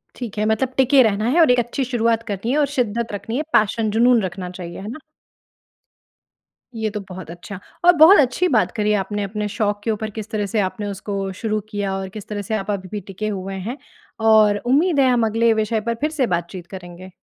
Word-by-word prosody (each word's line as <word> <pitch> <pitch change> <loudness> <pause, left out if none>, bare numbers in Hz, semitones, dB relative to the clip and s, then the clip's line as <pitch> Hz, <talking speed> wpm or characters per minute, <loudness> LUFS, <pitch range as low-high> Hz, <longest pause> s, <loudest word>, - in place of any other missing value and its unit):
ठीक 230 -4 -7
है, 210 - +1
मतलब 235 +4 0
टिके 265 +1 +5
रहना 215 0 +1
है 330 +6 +2
और 310 - +6
एक 245 - +3
अच्छी 240 +3 -2
शुरुआत 230 -2 0
करनी 210 +2 -3
है 290 - +1
और 295 - +4
शिद्दत 235 -2 -1
रखनी 215 +5 -4
है, 305 - -1
पैशन 215 +1 +2
जुनून 235 +1 +4
रखना 180 0 -5
चाहिए। 180 -1 -8
है 200 - -7
ना? 260 - -7 1.8
ये 220 -1 -1
तो 210 0 -5
बहुत 185 -3 -8
अच्छा, 180 +2 -9 0.3
और 355 - +9
बहुत 325 +6 +8
अच्छी 285 +7 +2
बात 225 -4 +2
करी 210 -1 +1
आपने 205 +1 -3
अपने 210 +1 -3
शौक 205 0 -1
के 225 - 0
ऊपर 215 0 -3
किस 220 0 -7
तरह 210 -2 -1
से 210 +2 -1
आपने 205 +2 -2
उसको 195 0 -4
शुरू 215 -1 0
किया 205 -2 -2
और 190 -1 -5
किस 210 +1 -9
तरह 205 -1 -4
से 200 - -5
आप 205 0 -2
अभी 190 -2 -4
भी 210 -1 -4
टिके 215 +3 -4
हुए 195 -1 -4
हैं 255 +4 -4 0.5
और 210 -2 +5
उम्मीद 290 +4 +3
है 260 -1 +5
हम 240 -2 +3
अगले 225 +1 +2
विषय 220 0 0
पर 230 +1 -2
फिर 305 +1 0
से 270 -6 0
बातचीत 175 +1 -3
करेंगे। 185 0 -10
215 Hz, 225 wpm, -21 LUFS, 200-235 Hz, 1.8 s, और